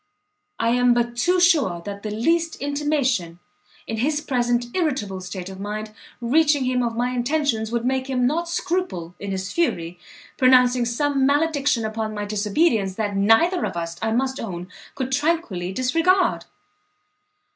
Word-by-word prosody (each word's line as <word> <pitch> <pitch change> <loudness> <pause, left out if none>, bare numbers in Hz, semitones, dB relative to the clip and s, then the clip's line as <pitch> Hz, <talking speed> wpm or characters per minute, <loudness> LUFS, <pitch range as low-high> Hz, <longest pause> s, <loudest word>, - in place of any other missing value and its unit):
"I 230 - +2
am 245 0 +3
but 240 0 0
too 360 +10 +2
sure, 305 - +3
that 200 -1 -6
the 215 - -4
least 325 +10 0
intimation, 280 - -1 0.5
in 225 - -4
his 295 +6 0
present 245 -4 0
irritable 260 - -1
state 180 0 -6
of 190 0 -9
mind, 215 +2 -5 0.3
reaching 290 +3 +2
him 250 0 +1
of 230 -1 -2
my 245 +1 0
intentions, 245 -3 0
would 235 0 -1
make 260 +1 -1
him 250 -2 +1
not 335 +6 0
scruple, 340 - -2
in 200 - -5
his 190 0 -4
fury, 175 - -1 0.4
pronouncing 250 -2 +5
some 270 +3 +1
malediction 285 -5 +1
upon 220 0 -3
my 210 0 -3
disobedience 210 - +1
that 205 -2 -2
neither 225 - +3
of - - -3
us, 170 0 -4
I 225 - 0
must 265 +3 0
own, 180 -4 -6 0.3
could 260 -1 -3
tranquilly 275 - 0
disregard." 330 - +2
245 Hz, 155 wpm, -23 LUFS, 210-290 Hz, 0.5 s, pronouncing